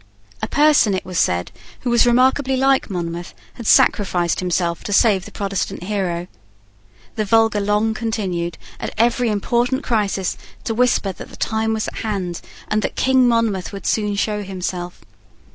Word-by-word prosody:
A - - -1
person, 290 -9 +4
it 185 - -4
was 180 -2 -2
said, 90 0 +1 0.3
who 245 - -1
was 235 0 +4
remarkably 260 +2 +3
like 270 -1 +2
Monmouth, 175 -1 -5 0.2
had 235 - -8
sacrificed 175 -4 +3
himself 175 -2 -1
to 205 - -2
save 200 -3 +4
the - - -10
Protestant 195 -2 -3
hero. 180 -3 -2 0.9
The 215 - +1
vulgar 225 0 +3
long 210 +2 +1
continued, 190 -7 -3 0.2
at - - -5
every 235 +1 +2
important 240 +6 0
crisis, 205 -5 0 0.3
to 225 - -2
whisper 240 -4 +2
that - - -10
the - - -12
time 220 0 0
was 220 -1 -1
at - - -7
hand, 190 -6 -3 0.3
and 215 0 0
that - - -3
King 260 -1 +3
Monmouth 230 -6 +1
would 200 - -8
soon 210 -2 0
show 210 +1 -1
himself. 180 - -5
210 Hz, 160 wpm, -20 LUFS, 185-235 Hz, 0.9 s, person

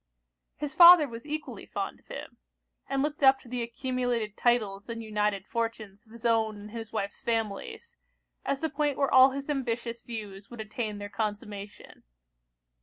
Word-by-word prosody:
His 295 -1 -4
father 345 -3 +9
was 235 +2 -9
equally 305 0 -5
fond - - -4
of - - -30
him; - - -8 0.5
and 275 0 +1
looked 300 0 -2
up 270 -1 +6
to - - -16
the 245 0 -3
accumulated 240 -2 -2
titles 215 -4 +1
and 230 0 -5
united 210 -2 -1
fortunes 220 -2 -4
of - - -21
his 235 +1 -11
own 220 -2 +2
and 210 +1 -10
his 225 -1 -7
wife's 200 -2 -3
families, 225 - -3 0.5
as 275 - -1
the 320 - 0
point 290 -1 0
where 275 -1 +1
all 260 +1 +9
his 275 +1 -5
ambitious 235 -4 -2
views 205 -4 -7
would 240 - -10
attain 215 0 -4
their 205 0 -6
consummation. 205 -1 -5
230 Hz, 170 wpm, -29 LUFS, 210-265 Hz, 0.5 s, father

